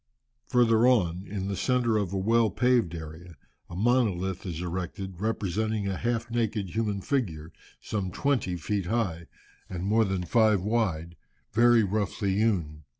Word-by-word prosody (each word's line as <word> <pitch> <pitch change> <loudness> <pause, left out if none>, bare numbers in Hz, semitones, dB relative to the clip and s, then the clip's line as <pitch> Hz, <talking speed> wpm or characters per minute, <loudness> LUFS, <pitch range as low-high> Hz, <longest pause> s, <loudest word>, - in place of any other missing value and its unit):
Further 120 -1 +4
on, 95 -7 +2
in 95 -1 -4
the 100 - -2
centre 120 0 +1
of 100 -4 0
a 100 - -2
well 115 +3 +3
paved 115 -4 +2
area, 80 +2 -9 0.3
a 85 - -8
monolith 95 -5 +1
is 85 -3 -4
erected, 90 +1 -5
representing 110 0 -1
a 95 - -1
half 120 +2 -2
naked 110 -5 -1
human 105 -3 -1
figure, 85 - -2 0.3
some 100 -4 -3
twenty 110 -4 0
feet 95 +2 -2
high, 90 -7 -1 0.4
and 90 -1 -5
more 110 +3 +3
than 95 -2 -2
five 110 +1 +3
wide, 95 -7 -1 0.4
very 120 0 +5
roughly 100 -1 -1
hewn. 95 -8 0
100 Hz, 150 wpm, -27 LUFS, 90-115 Hz, 0.4 s, very